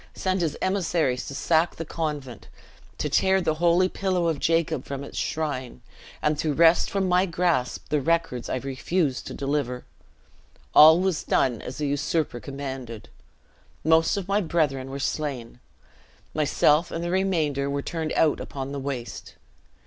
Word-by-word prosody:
sent 185 -1 -1
his 160 -3 -1
emissaries 170 -9 0
to 140 - -6
sack 160 +3 +2
the 165 - -5
convent, 145 -7 -5 0.5
to - - -1
tear 190 0 +3
the 165 -4 0
holy 175 +2 +4
pillow 185 -2 -1
of 160 -3 -1
Jacob 165 -5 +1
from 140 0 -6
its - - -10
shrine, 135 - -3 0.4
and 150 -1 +1
to 150 -3 0
wrest 165 +2 +5
from 195 -1 0
my 180 +1 +3
grasp 170 -7 -1
the 150 -1 +1
records 165 -5 0
I - - -1
refused 135 +3 -2
to - - -6
deliver. 135 -3 -2 0.9
All 160 +3 +9
was 185 -3 0
done 125 -4 +1
as 125 - -7
the 150 - -2
usurper 145 -1 -1
commanded. 130 -3 -7 0.7
Most 160 +4 +3
of 195 -2 -4
my 200 +2 +2
brethren 145 -7 0
were 135 - -5
slain. 135 -4 -3 0.7
Myself 150 +2 +2
and 165 - -4
the 175 - -2
remainder 160 -7 0
were 140 0 -2
turned 160 -2 -3
out 155 -2 +2
upon 135 0 -6
the 140 - -4
waste. 130 -5 -6
155 Hz, 155 wpm, -25 LUFS, 135-170 Hz, 0.9 s, All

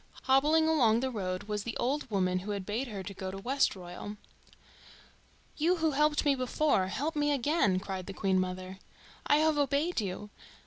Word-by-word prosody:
Hobbling 300 +5 +4
along 240 -8 +3
the 260 0 -1
road 185 -5 -3
was 210 0 -3
the 230 +2 -5
old 275 +2 -1
woman 185 -3 +1
who 195 +3 -8
had 200 -2 -3
bade 225 +7 -2
her 200 -4 -6
go 190 0 -6
to 190 - -6
Westroyal. 205 -4 -2 1.4
"You 335 +4 +3
who 320 -2 +1
helped 300 +1 +2
me 285 - +5
before, 255 -5 +1
help 295 - -2
me 295 0 +1
again!" 275 - +2
cried 190 -2 -5
the 195 - -5
Queen 190 -2 +1
mother. 185 +1 -4 0.5
"I - - +5
have 310 -1 +2
obeyed 285 +2 +1
you. 205 +1 -5
230 Hz, 175 wpm, -30 LUFS, 190-290 Hz, 1.4 s, me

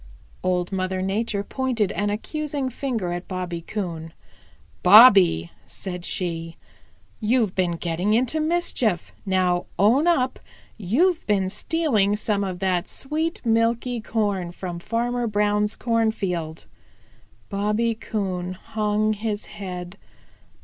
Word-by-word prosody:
Old 180 0 0
Mother 185 0 -1
Nature 200 +1 -1
pointed 235 -4 -1
an 205 0 -1
accusing 280 +5 -3
finger 235 -9 -2
at 175 +1 -5
Bobby 180 -2 -4
Coon. 165 -4 -5 0.7
"Bobby," 195 - +7 0.2
said 180 -2 -7
she, 165 -2 -3 0.6
"You've 220 -3 +1
been 180 -2 +1
getting 175 +4 -1
in 240 +3 +3 0.2
mischief. 255 - 0 0.2
Now 180 -2 +1
own 235 - +4
up 260 -7 +2 0.4
you've 300 - +1
been 195 -3 +2
stealing 215 - +1
some 210 -1 -1
of 185 -2 -3
that 185 -1 0
sweet, 310 +2 -3
milky 230 +1 +1
corn 205 -6 -1
from 175 -1 -6
Farmer 235 +4 -1
Brown's 210 0 +1
cornfield." 195 -9 -1 0.8
Bobby 210 +3 0
Coon 190 -5 -3
hung 215 +2 -1
his 210 0 -3
head. 180 -1 -7
205 Hz, 115 wpm, -24 LUFS, 180-230 Hz, 0.8 s, Bobby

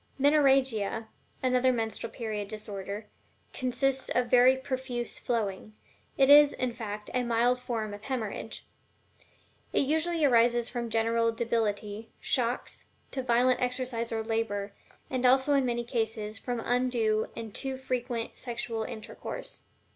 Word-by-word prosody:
MENORRHAGIA, 265 -7 +3 0.3
another 255 0 +3
menstrual 225 -3 -3
period 215 -4 -4
disorder, 205 0 -6 0.5
consists 265 +1 -1
of 245 -1 0
very 255 +1 +6
profuse 260 -2 -4
flowing 215 -3 -2 0.4
it 270 - +5
is, 290 0 +8
in 255 -2 -2
fact, 210 -3 -6
a 250 - +2
mild 240 +1 +2
form 230 -4 -3
of 205 +1 -9
hemorrhage. 225 -4 -4 1.1
It - - +3
usually 320 +3 +1
arises 240 -2 +4
from 240 -1 -3
general 230 +1 +2
debility, 225 -2 -2
shocks, 245 -1 -1 0.2
too 265 - -2
violent 250 0 +3
exercise 250 -2 -1
or 225 -1 -1
labor, 220 -3 -2 0.4
and 255 -1 -1
also 265 +3 +5
in 275 -2 +3
many 240 0 -1
cases 220 -3 -2
from 245 +1 -3
undue 235 -3 +1
and 225 -3 -6
too 270 -1 -2
frequent 245 -3 -3
sexual 240 -2 -3
intercourse. 220 0 -6
240 Hz, 130 wpm, -29 LUFS, 225-255 Hz, 1.1 s, is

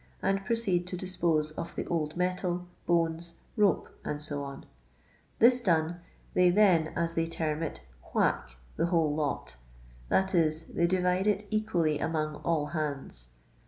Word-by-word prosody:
and 195 0 0
proceed 190 -5 0
to 180 - -4
dispose 170 -4 0
of 165 +2 -6
the - - -3
old 155 -1 -2
metal, 180 0 -1 0.2
bones, 170 0 +1 0.2
rope, 205 -5 +3 0.3
&c.; 150 0 -5 1.0
this 245 +2 +6
done, 170 -4 +1 0.4
tiiey 180 -1 +6
then, 185 -7 +5
as 170 0 0
they 165 0 0
term 160 -1 -2
it, 160 - -4 0.3
"whack" 60 - 0 0.2
the - - +2
whole 165 -4 +2
lot; 140 - -2 0.5
that 190 +1 +2
is, 160 -2 +2
they 170 +1 0
divide 180 +2 +2
it 210 0 +1
equally 175 -9 +1
among 155 -2 -1
all 160 -3 0
hands. 140 - -4
170 Hz, 140 wpm, -30 LUFS, 155-185 Hz, 1.0 s, this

